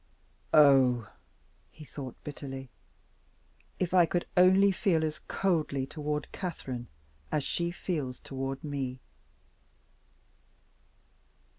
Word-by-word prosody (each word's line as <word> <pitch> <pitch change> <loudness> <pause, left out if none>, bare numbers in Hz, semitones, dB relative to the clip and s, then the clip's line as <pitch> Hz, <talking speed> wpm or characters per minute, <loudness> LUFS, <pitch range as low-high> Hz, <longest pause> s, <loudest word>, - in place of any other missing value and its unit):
"Oh," 130 -6 +6 0.6
he 155 - -13
thought 135 -3 -7
bitterly, 135 -3 -7 1.1
"if 180 -1 -1
I 175 -2 +6
could 175 +2 -1
only 190 +2 +6
feel 175 -3 +1
as 155 -1 -2
coldly 155 -8 0
toward 150 +1 -4
Catherine 130 -10 -5 0.4
as 150 - +1
she 170 +4 -1
feels 150 -8 -3
toward 135 0 -5
me!" 135 -4 -3
150 Hz, 95 wpm, -30 LUFS, 135-170 Hz, 1.1 s, Oh